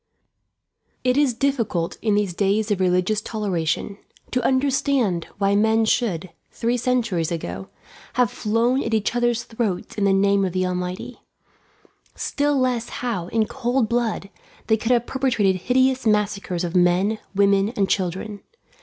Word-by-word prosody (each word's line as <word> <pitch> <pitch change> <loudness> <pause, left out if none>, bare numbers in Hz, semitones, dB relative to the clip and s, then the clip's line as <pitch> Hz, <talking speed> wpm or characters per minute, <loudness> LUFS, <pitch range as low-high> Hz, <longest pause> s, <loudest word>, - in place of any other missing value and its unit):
It 250 0 +2
is 280 -4 +2
difficult, 230 -11 -1
in 215 -2 +1
these 205 -3 0
days 205 +3 +1
of 200 - +1
religious 185 +3 +1
toleration, 200 -3 -2 0.3
to 250 - +1
understand 260 - +1
why 200 0 +2
men 220 +2 +3
should, 190 -7 0 0.2
three 235 +1 -1
centuries 235 -9 0
ago, 95 - -5 0.4
have 250 -1 +2
flown 235 +5 +1
at 225 - -1
each 220 +2 0
others' 240 -1 +1
throats 220 -6 -3
in 200 - +2
the 195 - +4
name 200 0 +3
of 185 -2 -1
the 185 0 0
Almighty; 180 0 -4 0.9
still 290 0 0
less 250 -3 0 0.2
how, 185 -8 -2
in 220 +3 +1
cold 240 0 -1
blood, 235 -4 -1 0.3
they 220 - +3
could 225 +2 -3
have 240 -1 +3
perpetrated 240 -9 +1
hideous 260 -1 +2
massacres 200 -4 0
of 175 +1 -3
men, 180 +4 +3 0.2
women, 200 0 +3
and 195 -2 +1
children. 190 +3 -2
210 Hz, 145 wpm, -22 LUFS, 190-240 Hz, 0.9 s, the